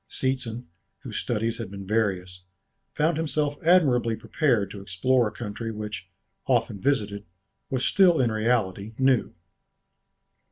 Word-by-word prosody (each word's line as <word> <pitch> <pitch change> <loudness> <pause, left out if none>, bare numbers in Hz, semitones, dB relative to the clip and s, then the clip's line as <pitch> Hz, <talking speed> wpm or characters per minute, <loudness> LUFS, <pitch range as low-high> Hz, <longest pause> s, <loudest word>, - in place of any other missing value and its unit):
Seetzen, 125 -3 -2 0.4
whose - - -6
studies 115 0 -1
had 115 -5 -5
been 100 0 -8
various, 95 -4 -1 0.5
found 155 +1 +2
himself 150 -2 -1
admirably 135 -10 +4
prepared 115 - 0
to 100 - -8
explore 115 +6 +2
a - - -5
country 115 0 -5
which, 105 -3 -6 0.4
often 100 - +1
visited, 105 -7 0 0.5
was 130 -1 -1
still 180 -5 +5
in 120 -3 +2
reality 110 -2 0
new. 130 -6 +2
115 Hz, 125 wpm, -26 LUFS, 105-130 Hz, 0.5 s, still